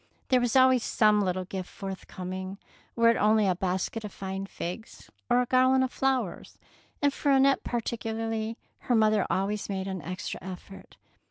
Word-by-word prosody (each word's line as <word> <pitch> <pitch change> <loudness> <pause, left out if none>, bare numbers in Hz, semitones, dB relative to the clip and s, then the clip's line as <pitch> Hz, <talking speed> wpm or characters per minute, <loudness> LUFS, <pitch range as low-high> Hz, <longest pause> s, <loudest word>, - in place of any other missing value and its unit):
There 255 -1 +4
was 245 0 0
always 260 -2 +5
some 210 -1 +3
little 185 -1 -1
gift 185 -1 -6
forthcoming, 190 0 -6 0.4
were 230 0 +5
it 230 - 0
only 215 0 +4
a 190 - +3
basket 190 +4 -2
of 210 - -6
fine 195 0 -5
figs 185 +5 -7 0.2
or 245 +1 +4
a - - -4
garland 255 +1 +4
of 260 - -1
flowers; 260 -8 -1 0.5
and 285 -1 +3
for 285 - 0
Annette 270 0 +4
particularly 225 -1 -3 0.2
her 245 - 0
mother 215 -1 +3
always 205 +2 -1
made 190 -1 -3
an 190 -2 -4
extra 185 +5 -5
effort. 190 +1 -10
215 Hz, 165 wpm, -28 LUFS, 190-245 Hz, 0.5 s, always